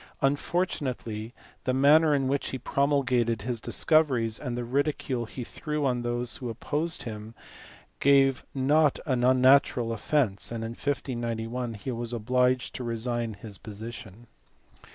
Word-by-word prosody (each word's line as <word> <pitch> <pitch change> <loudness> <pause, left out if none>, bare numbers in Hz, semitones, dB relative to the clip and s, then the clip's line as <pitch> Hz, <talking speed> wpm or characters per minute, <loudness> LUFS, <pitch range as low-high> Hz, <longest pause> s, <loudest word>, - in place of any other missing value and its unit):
Unfortunately 135 -7 -1 0.3
the 130 - +1
manner 150 +3 +5
in 135 -2 0
which 140 +1 0
he 130 - -4
pro 140 +2 0
mulgated 120 -6 +1
his 120 -1 -3
discoveries 130 -9 +2
and 125 -4 -4
the 120 - -2
ridicule 130 -1 -1
he 125 +3 -7
threw 150 +4 -3
on 125 -2 +1
those 120 0 -2
who 125 -3 -5
opposed 150 +8 -2
him 110 -2 -7 0.6
gave 135 -1 +4
not 145 +2 +3
unnatural 130 -2 +4
offence, 115 -3 0
and 115 -1 -4
in 115 - -4
1591 120 -3 -3
he 105 +5 -5
was 120 0 -3
obliged 125 +2 +1
to 130 - -5
resign 115 -1 -2
his 100 -1 -10
position. 110 0 -9
125 Hz, 135 wpm, -27 LUFS, 115-140 Hz, 0.6 s, manner